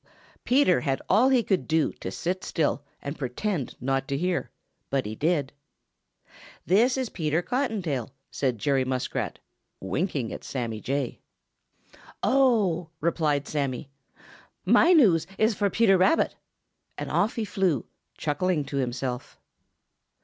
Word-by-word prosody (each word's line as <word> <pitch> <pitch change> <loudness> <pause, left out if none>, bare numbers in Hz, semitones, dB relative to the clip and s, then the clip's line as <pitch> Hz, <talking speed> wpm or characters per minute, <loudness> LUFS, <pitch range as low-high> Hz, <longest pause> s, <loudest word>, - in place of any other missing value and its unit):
Peter 245 -8 +4
had 135 -3 0
all 235 +7 +5
he 255 -3 +4
could 190 -12 0
do 160 -1 +2
to - - -6
sit 185 +2 -3
still 155 -3 0 0.2
and 140 +2 -5
pretend 140 - -2
not 135 +1 -1
to 140 -2 -1
hear, 180 +3 -1 0.4
but 135 -4 0
he 105 - -4
did. 150 +1 0 1.1
"This 235 +8 +4
is 260 -3 -1
Peter 160 0 -1
Cottontail," 195 - -1 0.2
said 130 -4 -1
Jerry 135 +5 +1
Muskrat, 130 -1 -2 0.4
winking 130 - -2
at - - -8
Sammy 115 -5 -4
Jay. 135 -2 -2 1.0
"Oh," 215 -11 +3
replied 150 -3 0
Sammy, 140 -2 -3 0.7
"my 340 - +5
news 210 - +5
is 220 +1 +3
for 200 0 +1
Peter 195 -2 +4
Rabbit!" 190 - +3 0.6
and - - -5
off 215 +4 +1
he 225 -3 -1
flew, 185 - 0 0.3
chuckling 155 +1 0
to 140 - -4
himself. 125 -1 -3
160 Hz, 130 wpm, -26 LUFS, 135-200 Hz, 1.1 s, all